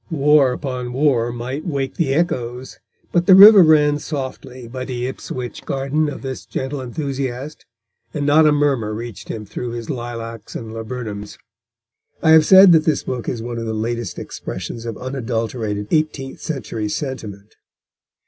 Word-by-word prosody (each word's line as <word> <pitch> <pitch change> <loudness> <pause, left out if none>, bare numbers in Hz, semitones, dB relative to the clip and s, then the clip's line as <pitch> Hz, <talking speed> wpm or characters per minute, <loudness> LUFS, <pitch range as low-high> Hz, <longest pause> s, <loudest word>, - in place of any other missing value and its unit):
War 150 -4 +4
upon 125 -2 -4
war 125 -4 +2
might 125 +5 -5
wake 140 -6 -3
the 160 -6 0
echoes, 125 -6 -2 0.3
but 175 0 +1
the 190 - +9
river 200 +1 +10
ran 150 -3 +4
softly 130 -4 -6
by 130 +2 -6
the 125 -1 -4
Ipswich 125 -1 -6
garden 140 +3 -1
of 145 - -8
this 130 -1 -5
gentle 135 +1 -4
enthusiast, 135 +1 -5 0.4
and 145 +2 -3
not 155 +2 +5
a - - +5
murmur 135 -8 +1
reached 115 -4 -8
him 110 -1 -5
through 120 +4 -5
his 120 +3 -5
lilacs 115 -3 -7
and 110 -1 -6
laburnums. 110 -3 -6 0.9
I 160 - +5
have 160 -1 +6
said 190 -1 +9
that 160 -2 +5
this 155 -3 +1
book 125 -2 -4
is 115 -3 -4
one 120 0 -4
of 115 - -4
the 110 - -2
latest 115 -1 -3
expressions 115 +6 -6
of 115 - -5
unadulterated 115 -5 -3
eighteenth 155 -4 -1
century 115 -8 -4
sentiment. 105 -7 -6
130 Hz, 160 wpm, -20 LUFS, 115-145 Hz, 0.9 s, river